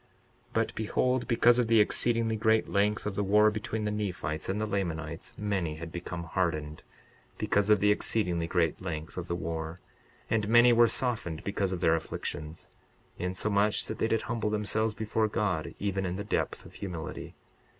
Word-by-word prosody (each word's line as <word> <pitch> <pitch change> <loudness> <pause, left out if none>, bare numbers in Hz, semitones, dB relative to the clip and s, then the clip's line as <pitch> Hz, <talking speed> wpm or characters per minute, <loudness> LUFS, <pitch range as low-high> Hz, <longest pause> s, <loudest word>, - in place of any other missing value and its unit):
62:41 - - -34 0.5
But - - 0
behold, 125 +3 0
because 120 0 +4
of 120 - +2
the 115 -1 +5
exceedingly 115 +1 +3
great 110 0 +2
length 105 +1 +1
of 105 - -2
the 100 - -1
war 105 +2 +5
between 110 0 -3
the 105 - 0
Nephites 95 -7 -3
and 100 +2 -1
the 110 - 0
Lamanites 85 -7 -3
many 95 -7 -1
had 85 +1 -8
become 85 0 -5
hardened, 80 -4 -2 0.6
because 105 0 +1
of 105 -2 +5
the 105 0 +5
exceedingly 90 -6 +1
great 85 -2 0
length 80 -3 -5
of 90 0 -5
the 85 - -1
war; 80 0 -4 0.5
and 110 -2 0
many 120 +1 +7
were 120 0 +6
softened 110 -9 -1
because 100 -1 -1
of 90 -2 -3
their 80 - +4
afflictions, 80 -1 -4 0.5
insomuch 100 +3 +1
that - - -5
they - - +2
did 115 -1 0
humble 115 -2 -2
themselves 105 +1 0
before 110 0 0
God, 100 -7 -1
even 95 -1 -1
in 90 - -3
the 100 - -4
depth 105 - -2
of - - -13
humility. 85 -6 -6
100 Hz, 180 wpm, -29 LUFS, 85-110 Hz, 0.6 s, many